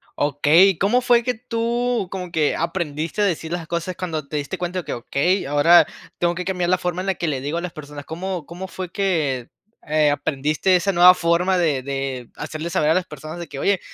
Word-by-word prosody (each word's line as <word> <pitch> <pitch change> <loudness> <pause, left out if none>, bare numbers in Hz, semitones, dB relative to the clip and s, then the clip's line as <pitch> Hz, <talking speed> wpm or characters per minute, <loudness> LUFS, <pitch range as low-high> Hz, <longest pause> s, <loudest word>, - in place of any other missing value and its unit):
Okey. 150 +6 +4
¿Cómo 225 +6 +3
fue 240 -1 +4
que 250 - 0
tú, 235 -1 -1
como 180 -2 -5
que 155 -3 +1
aprendiste 165 +1 -2
a - - +4
decir 165 -4 -2
las 170 -2 -4
cosas 170 +2 -3
cuando 160 -5 -4
te 150 - -3
diste 145 +6 -4
cuenta 180 +1 -3
de 180 - -7
que, - - -3
okey, 145 +10 0
ahora 145 +5 +6 0.3
tengo 175 0 +1
que 180 - -4
cambiar 180 -2 -1
la 185 - +3
forma 180 0 -2
en 190 - -6
la 190 - +1
que 170 - -3
le 140 -4 -2
digo 145 +5 -3
a 170 - -2
las 180 -2 -5
personas? 145 -1 -9
¿Cómo 175 0 -4
cómo 175 +4 -7
fue 185 -1 -6
que, 155 - -1 0.4
eh, 155 -1 +3
aprendiste 145 +5 +1
esa 180 +3 +2
nueva 180 0 +8
forma 180 +2 +1
de 150 -7 +1
de 135 -2 -4
hacerle 155 +2 -5
saber 150 -2 +1
a - - +5
las 185 -1 +1
personas 155 +1 -9
de 170 - -6
que, 140 - -8
oye, 200 +3 +2
170 Hz, 225 wpm, -22 LUFS, 150-185 Hz, 0.4 s, nueva